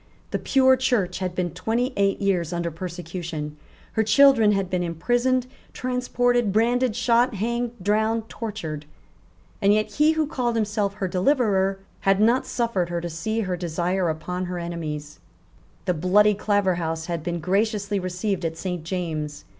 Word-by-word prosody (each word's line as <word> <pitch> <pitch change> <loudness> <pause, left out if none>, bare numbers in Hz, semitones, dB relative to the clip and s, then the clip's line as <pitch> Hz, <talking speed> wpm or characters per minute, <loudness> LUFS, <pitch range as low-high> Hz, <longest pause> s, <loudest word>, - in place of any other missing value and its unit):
The - - -1
pure 260 -1 +4
Church 210 -9 0
had 185 -2 -3
been 180 -2 -1
twenty 225 - -1
eight 200 0 +1
years 180 -5 0
under 170 -1 -2
persecution. 170 -3 -5 0.4
Her 220 - +1
children 225 0 +6
had 195 -2 0
been 180 0 -1
imprisoned, 240 +10 +1 0.3
transported, 245 -2 0
branded, 235 +2 +2
shot, 240 0 +2
hanged, 235 +3 -1
drowned, 220 +3 +1
tortured. 165 -12 -6 0.7
And 200 - +5
yet 215 0 0
he 300 +7 +3
who 315 -1 +1
called 250 -6 -1
himself 210 -2 0
her 195 -2 -2
deliverer 195 -1 +2 0.2
had 195 0 +2
not 235 +4 +3
suffered 230 -8 -1
her 175 0 -1
to 170 0 -5
see 220 +8 -2
her 185 -3 -1
desire 175 +1 -1
upon 180 +4 -3
her 180 0 -4
enemies, 155 -4 -5 0.7
The 180 - +2
bloody 195 +6 +4
Claverhouse 180 -6 0
had 170 -2 -3
been 175 +1 -3
graciously 200 +3 0
received 185 +1 -2
at 165 0 -2
Saint 180 -2 -4
James's. 160 -4 -4
195 Hz, 155 wpm, -24 LUFS, 175-230 Hz, 0.7 s, children